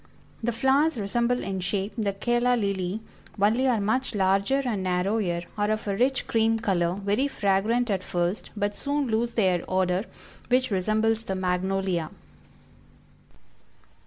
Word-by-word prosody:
The 235 +1 0
flowers 270 +5 +2
resemble 235 +4 0
in 190 -1 -3
shape 190 +2 -2
the 215 -4 0
Calla 240 +4 +1
Lily, 200 -2 -1 0.4
only 225 +6 +3
are 240 -4 +2
much 220 +4 0
larger 200 +8 +2
and 220 -6 -1
narrower, 180 0 0 0.2
are 205 0 +1
of 215 0 -2
a 200 - 0
rich 255 +5 +1
cream 225 0 +2
color, 180 -6 0
very 205 +7 0
fragrant 220 +1 +1
at 190 -2 -1
first, 175 +3 -2
but 205 0 -1
soon 285 -2 -1
lose 230 +2 0
their 185 -5 +2
odor, 185 +1 +1 0.4
which 255 -1 +2
resembles 215 +4 +1
the 190 - -2
Magnolia. 185 -2 -1
205 Hz, 140 wpm, -26 LUFS, 190-235 Hz, 0.4 s, only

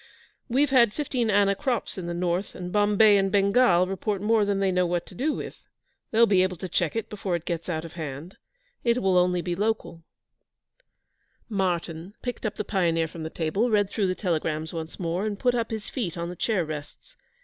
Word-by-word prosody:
'We've 270 +3 +2
had 235 -5 +5
fifteen 255 -6 -1
anna 200 -1 +4
crops 255 0 -2
in 180 -3 -5
the 175 - -2
north, 175 +2 -1
and 180 0 -6
Bombay 205 +1 +5
and 195 0 +1
Bengal 200 -2 +4
report 195 +2 -2
more 215 +1 +3
than 200 -1 0
they 195 -1 +2
know 180 -1 +2
what 175 0 -1
to - - -13
do 295 +5 0
with. - - -7 0.5
They'll 230 +1 +5
be 195 -4 +4
able 185 -1 0
to 185 - -5
check 175 0 0
it 225 - -2
before 195 -4 -3
it 170 -1 -5
gets 170 0 -3
out 160 -1 -2
of 165 - -10
hand. 155 +2 -7 0.5
It 235 0 +2
will 190 -3 +2
only 180 -1 +3
be 175 0 -2
local.' 190 -5 -2 1.5
Martyn 180 -2 -2
picked 245 -2 -3
up 210 - -5
the - - -3
Pioneer 165 -5 +1
from 160 +1 -9
the 160 - -4
table, 175 +10 0
read 205 -2 +2
through 205 -4 0
the 185 - 0
telegrams 160 -3 -2
once 160 -1 -6
more, 175 +3 -1
and 205 -1 -3
put 245 +3 +2
up 230 -2 -1
his 220 -2 -5
feet 185 -10 -3
on 170 0 -3
the 180 - -6
chair 190 -1 0
rests. 155 - -8
190 Hz, 210 wpm, -26 LUFS, 170-215 Hz, 1.5 s, had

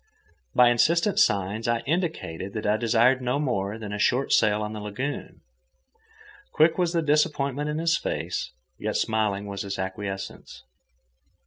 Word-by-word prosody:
By 125 -1 +7
insistent 170 - +2
signs 100 +4 +1
I 115 0 +1
indicated 140 - -3
that 110 - -4
I 105 +1 +3
desired 120 +3 +3
no 125 +2 0
more 110 -8 -1
than 105 -2 -6
a 105 - -4
short 125 +5 +2
sail 105 0 +3
on 105 0 -4
the 110 - -6
lagoon. 105 +8 -5 1.1
Quick 160 +3 +3
was 175 -2 +2
the 165 -1 +1
disappointment 150 -2 +1
in 150 - -2
his 165 +1 +2
face, - - -3 0.3
yet - - -1
smiling 105 -2 0
was 100 -1 -5
the 100 -1 -5
acquiescence. 95 0 -6
115 Hz, 150 wpm, -25 LUFS, 105-145 Hz, 1.1 s, By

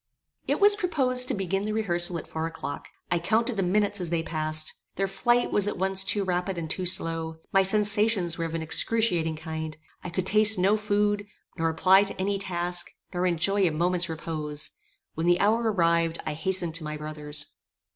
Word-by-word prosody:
It - - 0
was 410 0 +8
proposed 265 -10 +3
to - - 0
begin 195 0 -2
the 215 0 -3
rehearsal 175 -5 +2
at - - -8
four 160 0 -4
o'clock; 155 -3 -7 0.2
I 175 - +1
counted 225 +7 0
the 195 - -1
minutes 205 +2 0
as 175 - -4
they 165 -1 -1
passed; 155 -1 -2 0.2
their 195 +1 -1
flight 240 +5 0
was 205 -1 +2
at 205 - -3
once 190 +1 +1
too 200 +1 0
rapid 180 0 -2
and 165 -1 -4
too 180 +3 -2
slow; 165 -2 +1 0.2
my 195 - +5
sensations 205 -2 +3
were 165 - -3
of 165 0 -5
an 165 - -3
excruciating 170 -2 +1
kind; 160 0 -6 0.3
I - - -5
could 180 +2 -3
taste 215 +1 +4
no 190 +3 +3
food, 205 -1 -1 0.3
nor 165 -2 -1
apply 185 +4 +4
to 195 - -5
any 195 +1 -1
task, 175 -2 -1 0.2
nor 180 +1 0
enjoy 185 +3 +2
a - - 0
moment's 175 +2 0
repose: 155 -2 -3 0.4
when 160 +2 -3
the 175 0 +3
hour 225 +2 +2
arrived, 170 -3 +1
I 155 - -3
hastened 175 +1 0
to 165 - -7
my 150 0 -5
brother's. 150 -1 -6
180 Hz, 195 wpm, -26 LUFS, 165-205 Hz, 0.4 s, was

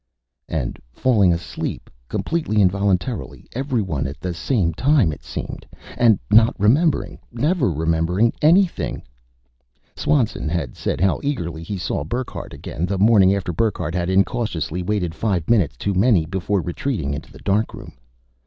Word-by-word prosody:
_ - - -54 0.5
And 70 -7 -3
falling 105 - +3
asleep, 85 0 -4 0.2
completely 160 -10 -1
involuntarily 100 - 0
everyone 110 - -1
at 70 +2 -8
the 90 -1 -3
same 85 0 0
time, 130 - +3
it 75 - -9
seemed. - - -6 0.3
And 115 -4 +4
not 110 +2 +5
remembering, 140 - +2
never 145 - +1
remembering 80 +7 +1
anything 175 +4 +2 0.9
Swanson 125 - 0
had 80 -7 -3
said - - -2
how 95 0 +2
eagerly 85 - -3
he 95 +5 -5
saw 85 -4 -2
Burckhardt 120 - -5
again, 85 +4 -4
the 100 +1 -1
morning 100 -2 +5
after 95 -3 -3
Burckhardt 90 -4 -1
had 90 0 -1
incautiously 95 -4 0
waited 90 -3 -1
five 90 -4 -1
minutes 105 -10 +2
too 100 - -1
many 95 -3 +3
before 95 +3 -1
retreating 85 - -2
into 75 - -7
the - - -13
darkroom. 105 +3 -2
95 Hz, 145 wpm, -21 LUFS, 85-115 Hz, 0.9 s, not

